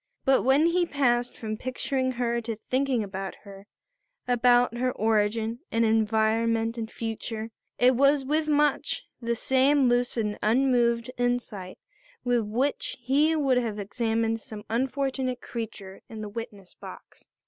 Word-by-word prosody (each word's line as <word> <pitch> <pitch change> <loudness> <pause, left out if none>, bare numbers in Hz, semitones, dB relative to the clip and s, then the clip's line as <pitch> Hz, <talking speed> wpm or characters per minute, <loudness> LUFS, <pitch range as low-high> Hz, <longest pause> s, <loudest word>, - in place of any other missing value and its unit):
But 270 0 +4
when 270 +5 +4
he 345 +1 +2
passed 245 -4 +1
from 215 -1 -4
picturing 260 +1 -2
her 235 -1 -1
to 225 -1 -4
thinking 255 +2 -1
about 195 -1 -5
her, 200 0 -12 0.6
about 245 -1 +3
her 255 0 +1
origin 220 +1 0
and 230 0 +2
environment 225 +1 +1
and 225 -2 -4
future, 225 0 -5 0.3
it 250 +1 +4
was 275 +1 +3
with 305 +3 0
much 295 -1 +1 0.2
the 235 0 -1
same 265 +3 +3
lucid 245 -2 +1
and 210 0 -4
unmoved 235 0 +2
insight 240 -6 -2 0.5
with 245 -1 +2
which 240 +7 -2
he 290 +6 +2
would 275 -5 +2
have 225 -4 -3
examined 225 +2 -1
some 215 -4 -9
unfortunate 260 +1 -1
creature 215 -6 -7
in 220 -2 -7
the 210 - -5
witness 205 -4 -8
box. - - -13
235 Hz, 140 wpm, -27 LUFS, 220-260 Hz, 0.6 s, But